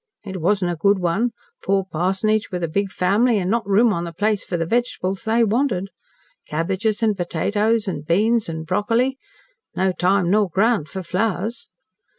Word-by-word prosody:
It 190 Hz, -3 st, -6 dB
wasn't 185 Hz, 0 st, +1 dB
a -, -, -2 dB
good 200 Hz, +5 st, +3 dB
one 185 Hz, +7 st, 0 dB, 0.3 s
poor 195 Hz, -1 st, +1 dB
parsonage 195 Hz, +6 st, 0 dB
with 180 Hz, -2 st, -3 dB
a -, -, +1 dB
big 200 Hz, +5 st, -1 dB
family 210 Hz, +6 st, +2 dB
an' 185 Hz, -1 st, -1 dB
not 230 Hz, -3 st, 0 dB
room 215 Hz, +3 st, +4 dB
on 170 Hz, -, -2 dB
the 170 Hz, -, -5 dB
place 210 Hz, +4 st, 0 dB
for 175 Hz, -, -3 dB
the 165 Hz, -, -1 dB
vegetables 195 Hz, -3 st, -1 dB
they 225 Hz, +1 st, +3 dB
wanted. 220 Hz, -4 st, 0 dB, 0.6 s
Cabbages, 190 Hz, +8 st, -1 dB
an' 220 Hz, -1 st, +3 dB
potatoes, 205 Hz, +5 st, 0 dB
an' 165 Hz, -6 st, -3 dB
beans, 210 Hz, +7 st, +1 dB
an' 160 Hz, -1 st, -4 dB
broccoli. 230 Hz, +9 st, 0 dB, 0.6 s
No 190 Hz, 0 st, +2 dB
time 180 Hz, 0 st, +1 dB
nor 205 Hz, -1 st, +3 dB
ground 195 Hz, -3 st, +1 dB
for 190 Hz, -1 st, -6 dB
flowers. 205 Hz, +5 st, -2 dB
195 Hz, 170 wpm, -21 LUFS, 180-220 Hz, 0.6 s, room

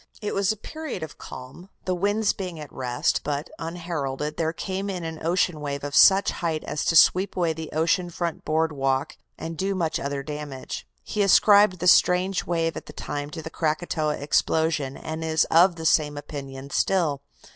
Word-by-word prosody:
It 210 Hz, -, -3 dB
was 195 Hz, 0 st, +2 dB
a 220 Hz, -, -4 dB
period 310 Hz, -, -6 dB
of 160 Hz, -, -9 dB
calm, 130 Hz, +9 st, -10 dB, 0.2 s
the 185 Hz, -, 0 dB
winds 205 Hz, +4 st, +1 dB
being 180 Hz, -4 st, -6 dB
at 150 Hz, -2 st, -9 dB
rest, 125 Hz, -2 st, 0 dB
but, 145 Hz, +2 st, -3 dB
unheralded, 155 Hz, -4 st, -4 dB
there 160 Hz, 0 st, 0 dB
came 190 Hz, +3 st, -4 dB
in 180 Hz, -3 st, -4 dB
an 160 Hz, -1 st, -6 dB
ocean 170 Hz, -1 st, +1 dB
wave 140 Hz, -1 st, -4 dB
of 145 Hz, -1 st, -4 dB
such 195 Hz, +1 st, +6 dB
height 160 Hz, -3 st, -2 dB
as 150 Hz, -, -3 dB
to 165 Hz, -, +1 dB
sweep 185 Hz, +4 st, +5 dB
away 170 Hz, -3 st, +1 dB
the 160 Hz, 0 st, -7 dB
ocean 170 Hz, +3 st, +1 dB
front 170 Hz, -1 st, -4 dB
boardwalk 145 Hz, -4 st, 0 dB, 0.2 s
and 165 Hz, 0 st, -6 dB
do 195 Hz, +4 st, -1 dB
much 165 Hz, -4 st, -1 dB
other 140 Hz, 0 st, -3 dB
damage. 145 Hz, -, -6 dB, 0.2 s
He 210 Hz, -, -2 dB
ascribed 200 Hz, 0 st, +6 dB
this 180 Hz, +1 st, +5 dB
strange 180 Hz, +1 st, +3 dB
wave 165 Hz, -1 st, 0 dB
at -, -, -8 dB
the -, -, -10 dB
time 145 Hz, 0 st, -5 dB
to 160 Hz, +1 st, -7 dB
the 160 Hz, -, -7 dB
Krakatoa 155 Hz, -1 st, -1 dB
explosion, 150 Hz, -1 st, 0 dB
and 160 Hz, +1 st, -5 dB
is 160 Hz, -1 st, +2 dB
of 175 Hz, +2 st, +6 dB
the 160 Hz, -1 st, -7 dB
same 150 Hz, -2 st, +2 dB
opinion 140 Hz, -2 st, -8 dB
still. 160 Hz, -7 st, +1 dB
160 Hz, 185 wpm, -25 LUFS, 150-180 Hz, 0.2 s, such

